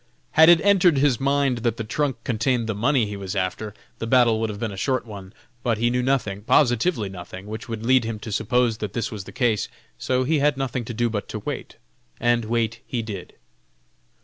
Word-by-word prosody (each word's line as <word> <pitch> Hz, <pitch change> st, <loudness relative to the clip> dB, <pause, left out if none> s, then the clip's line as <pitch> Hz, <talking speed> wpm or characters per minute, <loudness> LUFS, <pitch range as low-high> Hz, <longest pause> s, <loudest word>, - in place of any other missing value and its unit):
Had 160 Hz, +2 st, +7 dB
it 175 Hz, -1 st, +8 dB
entered 185 Hz, -6 st, +4 dB
his 135 Hz, -4 st, +3 dB
mind 140 Hz, -2 st, +1 dB
that 115 Hz, -1 st, -1 dB
the 115 Hz, -, -3 dB
trunk 135 Hz, +4 st, -1 dB
contained 120 Hz, 0 st, 0 dB
the 110 Hz, -, -2 dB
money 120 Hz, +3 st, +2 dB
he 105 Hz, 0 st, -5 dB
was 100 Hz, -1 st, -5 dB
after, 100 Hz, +3 st, -2 dB, 0.3 s
the 115 Hz, -, -3 dB
battle 120 Hz, -2 st, +4 dB
would 110 Hz, 0 st, -1 dB
have 100 Hz, -1 st, -6 dB
been 110 Hz, -2 st, -2 dB
a -, -, -7 dB
short 130 Hz, +5 st, -1 dB
one. 100 Hz, -4 st, -9 dB, 0.3 s
But 115 Hz, -2 st, 0 dB
he 120 Hz, +2 st, +1 dB
knew 125 Hz, 0 st, +1 dB
nothing, 120 Hz, -7 st, 0 dB
positively 120 Hz, -, +2 dB
nothing, 95 Hz, 0 st, -9 dB
which 110 Hz, +3 st, -7 dB
would 115 Hz, -1 st, -5 dB
lead 130 Hz, 0 st, +4 dB
him 115 Hz, -1 st, -3 dB
to 110 Hz, -, -6 dB
suppose 115 Hz, +2 st, +1 dB
that 105 Hz, -2 st, -4 dB
this 115 Hz, +4 st, -2 dB
was 105 Hz, -4 st, -6 dB
the -, -, -10 dB
case; 115 Hz, -6 st, +1 dB, 0.3 s
so 130 Hz, 0 st, 0 dB
he 150 Hz, +3 st, +1 dB
had 145 Hz, 0 st, +2 dB
nothing 130 Hz, -3 st, -2 dB
to 120 Hz, -, -5 dB
do 120 Hz, +1 st, +1 dB
but 110 Hz, -3 st, -4 dB
to -, -, -4 dB
wait, -, -, -5 dB, 0.4 s
and 120 Hz, -1 st, +2 dB
wait 115 Hz, 0 st, -1 dB
he 120 Hz, -3 st, -2 dB
did. 100 Hz, -5 st, -7 dB
115 Hz, 220 wpm, -23 LUFS, 110-130 Hz, 0.4 s, it